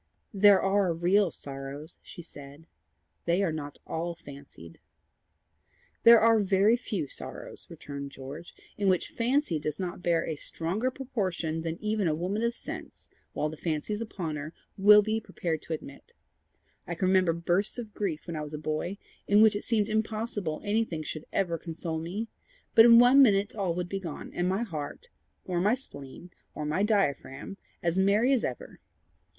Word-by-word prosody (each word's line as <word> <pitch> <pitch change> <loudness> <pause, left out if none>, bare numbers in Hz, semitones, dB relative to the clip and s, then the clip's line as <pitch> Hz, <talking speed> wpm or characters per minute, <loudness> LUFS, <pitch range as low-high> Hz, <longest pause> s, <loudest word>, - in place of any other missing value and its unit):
"There 200 -1 +6
are 195 -2 +2
real 180 +3 +3
sorrows," 140 +2 -8
she 175 - -11
said. 145 +1 -12 0.6
"They 175 +3 +2
are 175 - +1
not 145 -2 -6
all 170 +1 -3
fancied." 140 - -13 1.2
"There 230 0 +9
are 225 0 +5
very 200 +2 +4
few 210 -9 -3
sorrows," - - -6
returned 140 -1 -7
George, 140 +5 -9 0.2
"in 200 -1 +3
which 185 -2 +1
fancy 240 - +1
does 150 0 -3
not 180 -2 -4
bear 170 -2 +1
a 160 - -3
stronger 180 - -2
proportion 190 -12 -3
than 165 0 -3
even 210 -3 0
a 155 - +1
woman 185 +6 -2
of 235 0 0
sense, - - -8 0.2
while 150 - -1
the 155 +1 -7
fancy 155 +5 -2
is 210 - -3
upon 175 -9 -4
her, 155 +3 -7 0.2
will 210 +1 +7
be 220 +1 0
prepared 175 -6 -3
to 165 - -5
admit. 140 -3 -9 0.7
I 170 - -3
can 185 +2 0
remember 185 -2 +4
bursts 175 +6 0
of 225 -4 -7
grief 180 -7 -3
when 170 - -5
I 155 - -3
was 150 0 -6
a - - -4
boy, 155 +5 -3 0.3
in 205 +2 +6
which 220 -1 +5
it 205 - -3
seemed 215 -3 +1
impossible 215 -6 -2
anything 205 -6 0
should 155 0 -6
ever 170 -4 0
console 165 -1 -4
me; 190 +8 -4 0.5
but 225 -1 +9
in 230 -1 +9
one 250 +3 +7
minute 205 -5 +4
all 190 -5 -1
would 180 0 -2
be 195 +2 -3
gone, 170 -6 -7
and 175 +1 0
my 195 +5 0
heart, 165 - -6 0.4
or 175 -2 -1
my 210 +6 +3
spleen, 170 - -10 0.2
or 150 - -4
my 155 +6 0
diaphragm, 195 -5 0 0.3
as 170 +2 +1
merry 210 +7 +4
as 255 - +1
ever. 125 - -5
180 Hz, 175 wpm, -28 LUFS, 155-210 Hz, 1.2 s, There